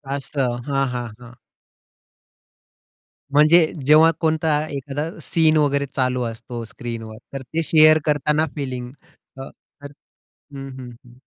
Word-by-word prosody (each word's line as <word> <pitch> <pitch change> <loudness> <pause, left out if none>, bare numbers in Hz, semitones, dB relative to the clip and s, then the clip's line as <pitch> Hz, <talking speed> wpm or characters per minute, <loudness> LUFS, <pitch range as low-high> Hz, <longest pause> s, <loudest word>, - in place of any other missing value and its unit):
असं. 135 -3 -2
हां, 135 -1 +1
हां, 120 -1 -3
हां. 120 -1 -13 2.0
म्हणजे 155 +3 +6 0.2
जेव्हा 155 +2 +6
कोणता 160 -1 +1 0.2
एखादा 140 +1 -4 0.2
सीन 160 -1 +2
वगैरे 140 -1 +1
चालू 125 -1 0
असतो 115 +1 -6
स्क्रीनवर. 115 -1 -8 0.2
तर 135 - -5
ते 160 +6 -3
शेअर 155 0 +6
करताना 150 +1 +1
फिलिंग 130 -4 -5 0.5
अ, 135 - -7 0.3
तर 145 0 -9 0.6
हं, 135 0 -7
हं, 125 -2 -9 0.2
हं. 120 - -17
140 Hz, 120 wpm, -21 LUFS, 125-155 Hz, 2.0 s, म्हणजे